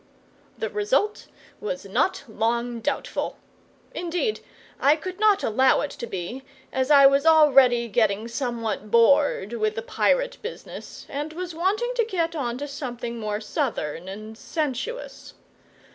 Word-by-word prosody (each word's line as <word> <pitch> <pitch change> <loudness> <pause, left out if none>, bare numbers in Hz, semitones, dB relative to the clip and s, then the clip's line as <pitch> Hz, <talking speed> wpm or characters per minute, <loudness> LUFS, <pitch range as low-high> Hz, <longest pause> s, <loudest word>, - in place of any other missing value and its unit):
The - - -3
result 420 0 0 0.3
was 275 - -4
not 200 - 0
long 235 +2 -1
doubtful. 225 - -2 0.6
Indeed, 355 +6 -1 0.4
I 285 +3 +5
could 365 +5 -7
not 420 -2 +4
allow 260 +5 +3
it 290 - -3
to 235 - -7
be, 195 +6 -5 0.3
as 260 +1 0
I 280 -2 +8
was 275 +1 +5
already 270 -7 +6
getting 215 -1 +1
somewhat 230 -4 -3
bored 235 -2 +4
with 215 -2 0
the 225 - -4
pirate - - +1
business, 465 +3 -8
and 295 +3 -4
was 355 +1 -5
wanting 410 +9 0
to 470 - +4
get 335 -6 -1
on 245 -5 -2
to 290 +2 -5
something 245 -5 -5
more 210 -1 -2
southern 210 - -3
and 215 +3 -8
sensuous. 310 - -4
270 Hz, 140 wpm, -25 LUFS, 230-335 Hz, 0.6 s, I